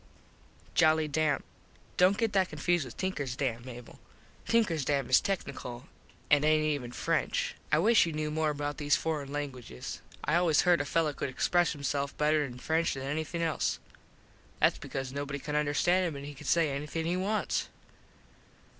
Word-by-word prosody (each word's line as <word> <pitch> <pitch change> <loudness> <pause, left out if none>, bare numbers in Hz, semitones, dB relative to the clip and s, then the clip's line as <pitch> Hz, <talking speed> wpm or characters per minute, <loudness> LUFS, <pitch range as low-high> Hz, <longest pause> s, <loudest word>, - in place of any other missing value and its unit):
Joli 155 0 +4
Dame: 150 -1 +1 0.5
Dont 185 +3 +4
get 225 -2 0
that 190 -2 +2
confused 155 +1 0
with 120 - -10
Tinkers 145 -9 -2
Dam, 120 -4 -2
Mable. 120 -1 -10 0.5
Tinkers 210 -10 +2
Dam 140 -2 0
is - - +7
tecknickle 135 -10 -4 0.5
an 145 0 +5
aint 155 0 +4
even 145 -6 -1
French. - - -1 0.2
I - - +5
wish 210 +2 +5
you - - -2
knew 155 0 -2
more 155 0 +1
about 145 -1 -3
these 145 -1 +3
forin 150 -4 -2
languiges. 135 - -6 0.3
I 150 +4 +3
always 170 -4 +4
herd 175 -3 +4
a - - -3
fello 155 0 +1
could 140 - -3
express 175 +6 +2
himself 140 -1 -2
better 150 0 +3
in 125 -3 -6
French 160 +5 0
than 135 - -5
anything 155 +4 -2
else. 165 -1 0 0.8
Thats - - +3
because 135 -1 -5
nobody 140 0 -3
can 150 +1 -5
understand 175 +5 +2
him 160 - -4
an 140 - -7
he 145 +1 -7
can 145 +1 -10
say 165 -4 +3
anything 150 +4 -3
he 175 +2 0
wants. 200 +4 -1
150 Hz, 170 wpm, -30 LUFS, 140-165 Hz, 0.8 s, is